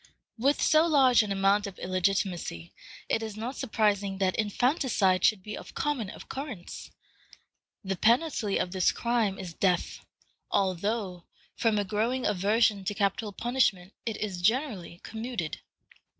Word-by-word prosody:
With 275 Hz, +5 st, +2 dB
so 310 Hz, +2 st, +5 dB
large 265 Hz, -7 st, +5 dB
an 210 Hz, -2 st, -3 dB
amount 195 Hz, +1 st, +2 dB
of 195 Hz, -, -9 dB
illegitimacy, 185 Hz, -, -1 dB, 0.3 s
it 225 Hz, -, +1 dB
is 220 Hz, -2 st, -6 dB
not 240 Hz, +5 st, -4 dB
surprising 205 Hz, -5 st, 0 dB
that 190 Hz, -1 st, +1 dB
infanticide 220 Hz, -, +1 dB
should 200 Hz, -3 st, +3 dB
be 210 Hz, +1 st, -6 dB
of -, -, -10 dB
common 270 Hz, -9 st, -1 dB
occurrence. 255 Hz, -6 st, -7 dB, 0.9 s
The 195 Hz, 0 st, -2 dB
penalty 230 Hz, -, +2 dB
of 180 Hz, -, -1 dB
this 185 Hz, -2 st, +2 dB
crime 230 Hz, -5 st, 0 dB
is 180 Hz, -3 st, -7 dB
death, 180 Hz, 0 st, 0 dB, 0.5 s
although, 195 Hz, -1 st, -1 dB, 0.3 s
from 225 Hz, -2 st, +1 dB
a 205 Hz, -, 0 dB
growing 230 Hz, +6 st, -1 dB
aversion 210 Hz, +1 st, +2 dB
to 205 Hz, +2 st, -2 dB
capital 200 Hz, +2 st, 0 dB
punishment, 210 Hz, -5 st, 0 dB
it 225 Hz, -3 st, -3 dB
is 195 Hz, -4 st, -4 dB
generally 215 Hz, -, 0 dB
commuted. 220 Hz, -7 st, -4 dB
210 Hz, 135 wpm, -28 LUFS, 190-235 Hz, 0.9 s, so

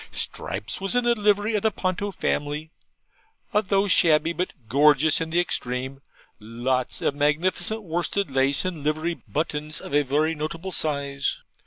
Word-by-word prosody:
Stripes 95 Hz, -, -3 dB
was 195 Hz, +4 st, -1 dB
in 245 Hz, -, +3 dB
the 240 Hz, 0 st, +4 dB
livery 210 Hz, 0 st, +2 dB
of 210 Hz, -, +1 dB
the 220 Hz, -, +3 dB
Ponto 195 Hz, 0 st, -2 dB
family 150 Hz, -4 st, -2 dB, 0.8 s
a 210 Hz, -, +4 dB
thought 195 Hz, -1 st, +1 dB
shabby, 165 Hz, -1 st, +4 dB
but 180 Hz, +2 st, -2 dB, 0.2 s
gorgeous 145 Hz, +4 st, +4 dB
in 160 Hz, -, -2 dB
the 170 Hz, +2 st, +1 dB
extreme 130 Hz, -4 st, -2 dB, 0.4 s
lots 120 Hz, +4 st, -2 dB
of -, -, +2 dB
magnificent 175 Hz, +8 st, 0 dB
worsted 175 Hz, +1 st, -1 dB
lace, 135 Hz, +4 st, +2 dB
and 175 Hz, -5 st, -3 dB
livery 155 Hz, +3 st, 0 dB
buttons 155 Hz, 0 st, -2 dB
of -, -, -9 dB
a 145 Hz, -, +5 dB
very 150 Hz, +4 st, +1 dB
notable 165 Hz, +4 st, -4 dB
size. 140 Hz, -4 st, -1 dB
155 Hz, 155 wpm, -25 LUFS, 140-185 Hz, 0.8 s, a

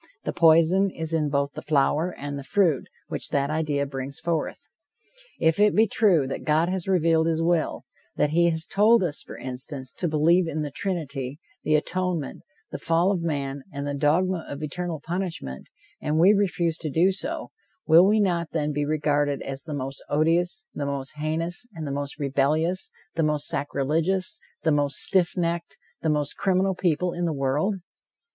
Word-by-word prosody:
The -, -, -3 dB
poison 170 Hz, +4 st, +5 dB
is 160 Hz, -2 st, -5 dB
in 155 Hz, -2 st, +1 dB
both 140 Hz, 0 st, 0 dB
the -, -, -6 dB
flower 155 Hz, +3 st, +1 dB
and 145 Hz, 0 st, -5 dB
the 140 Hz, -, -6 dB
fruit 165 Hz, -3 st, +1 dB, 0.2 s
which -, -, -4 dB
that 140 Hz, +1 st, 0 dB
idea 150 Hz, -2 st, 0 dB
brings 135 Hz, +1 st, -6 dB
forth. 170 Hz, -, -3 dB, 0.7 s
If 160 Hz, +3 st, +2 dB
it 210 Hz, 0 st, +4 dB
be 220 Hz, -, +6 dB
true 195 Hz, -9 st, +3 dB
that 130 Hz, -, -5 dB
God 160 Hz, +3 st, +2 dB
has 185 Hz, -1 st, -2 dB
revealed 165 Hz, -3 st, +3 dB
his 165 Hz, -1 st, +1 dB
will, 170 Hz, -1 st, 0 dB, 0.3 s
that 150 Hz, -, +1 dB
he 170 Hz, +2 st, +4 dB
has 160 Hz, -1 st, -1 dB
told 215 Hz, +2 st, +4 dB
us, 160 Hz, -5 st, -2 dB
for -, -, -10 dB
instance, 130 Hz, +1 st, -5 dB
to 175 Hz, -, -2 dB
believe 165 Hz, +3 st, +3 dB
in 155 Hz, -1 st, -2 dB
the 145 Hz, -, -4 dB
Trinity, 145 Hz, -7 st, -3 dB, 0.2 s
the 155 Hz, -, +2 dB
atonement, 175 Hz, -1 st, -1 dB, 0.3 s
the -, -, -5 dB
fall 170 Hz, +4 st, +2 dB
of 185 Hz, -4 st, -1 dB
man, 140 Hz, -4 st, -2 dB
and 140 Hz, -1 st, -5 dB
the 145 Hz, -, -2 dB
dogma 165 Hz, +5 st, +1 dB
of 145 Hz, +2 st, -6 dB
eternal 170 Hz, +2 st, -3 dB
punishment, 165 Hz, -, -5 dB, 0.3 s
and 150 Hz, +1 st, 0 dB
we 180 Hz, +6 st, +6 dB
refuse 180 Hz, -5 st, 0 dB
to 155 Hz, -, -3 dB
do 170 Hz, +6 st, +3 dB
so, 190 Hz, -, -4 dB, 0.3 s
will 170 Hz, +4 st, +7 dB
we 215 Hz, +2 st, +4 dB
not, 175 Hz, -5 st, +1 dB
then, 150 Hz, -2 st, 0 dB
be 145 Hz, 0 st, -1 dB
regarded 145 Hz, -2 st, 0 dB
as 135 Hz, 0 st, -4 dB
the 155 Hz, 0 st, -5 dB
most 135 Hz, 0 st, -4 dB
odious, 175 Hz, +4 st, +1 dB
the 145 Hz, -, -3 dB
most 140 Hz, -1 st, -3 dB
heinous, 165 Hz, +7 st, -2 dB
the 150 Hz, -3 st, -3 dB
most 140 Hz, +1 st, -4 dB
rebellious, 150 Hz, +5 st, 0 dB, 0.2 s
the 165 Hz, -, 0 dB
most 150 Hz, -2 st, +1 dB
sacrilegious, 155 Hz, +7 st, -1 dB, 0.2 s
the 160 Hz, -, +3 dB
most 145 Hz, -1 st, +1 dB
stiff 185 Hz, -2 st, +1 dB
necked, 170 Hz, -1 st, -2 dB, 0.2 s
the 160 Hz, -, 0 dB
most 150 Hz, -2 st, 0 dB
criminal 190 Hz, 0 st, +2 dB
people 180 Hz, -1 st, 0 dB
in 175 Hz, 0 st, -2 dB
the 165 Hz, -, 0 dB
world? 145 Hz, +8 st, 0 dB
160 Hz, 180 wpm, -25 LUFS, 145-175 Hz, 0.7 s, will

